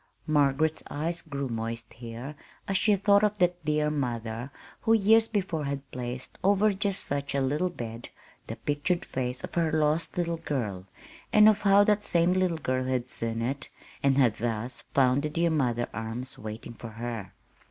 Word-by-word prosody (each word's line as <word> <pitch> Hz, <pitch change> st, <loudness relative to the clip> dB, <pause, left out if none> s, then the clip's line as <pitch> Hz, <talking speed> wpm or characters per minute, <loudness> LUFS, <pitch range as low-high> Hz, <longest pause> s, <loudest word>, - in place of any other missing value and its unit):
Margaret's 150 Hz, +1 st, +2 dB
eyes 165 Hz, +4 st, -2 dB
grew 140 Hz, -4 st, -4 dB
moist 115 Hz, 0 st, -4 dB
here 120 Hz, +4 st, -7 dB, 0.3 s
as 195 Hz, -, -1 dB
she 210 Hz, +2 st, +4 dB
thought 200 Hz, +1 st, +4 dB
of 210 Hz, 0 st, +2 dB
that 180 Hz, -2 st, +1 dB
dear 150 Hz, 0 st, +1 dB
mother 120 Hz, -3 st, -3 dB, 0.3 s
who 225 Hz, -, +3 dB
years 225 Hz, +1 st, +5 dB
before 185 Hz, -8 st, -1 dB
had 140 Hz, -1 st, -4 dB
placed 125 Hz, 0 st, -6 dB
over 205 Hz, +2 st, +4 dB
just 200 Hz, -1 st, -1 dB
such 140 Hz, 0 st, -2 dB
a -, -, +2 dB
little 145 Hz, +7 st, +1 dB
bed 115 Hz, -7 st, -7 dB, 0.4 s
the -, -, -4 dB
pictured 160 Hz, +5 st, -1 dB
face 125 Hz, -1 st, -3 dB
of -, -, -7 dB
her 165 Hz, -2 st, +1 dB
lost 155 Hz, +2 st, +1 dB
little 170 Hz, -1 st, 0 dB
girl, 105 Hz, -, -3 dB, 0.4 s
and 210 Hz, 0 st, +7 dB
of 215 Hz, -1 st, +4 dB
how 200 Hz, 0 st, +6 dB
that 210 Hz, 0 st, +2 dB
same 175 Hz, -1 st, +3 dB
little 185 Hz, -3 st, +1 dB
girl 130 Hz, -4 st, -1 dB
had 130 Hz, -1 st, -1 dB
seen 115 Hz, 0 st, -2 dB
it 135 Hz, +3 st, -2 dB, 0.3 s
and 135 Hz, -1 st, +3 dB
had 120 Hz, -6 st, +4 dB
thus 120 Hz, +1 st, -3 dB, 0.2 s
found 130 Hz, 0 st, +4 dB
the 150 Hz, -, -2 dB
dear 170 Hz, +2 st, +1 dB
mother 120 Hz, -6 st, +1 dB
arms 115 Hz, +4 st, -5 dB
waiting 110 Hz, +2 st, -7 dB
for 115 Hz, 0 st, -9 dB
her. 115 Hz, -3 st, -5 dB
140 Hz, 175 wpm, -28 LUFS, 120-175 Hz, 0.4 s, and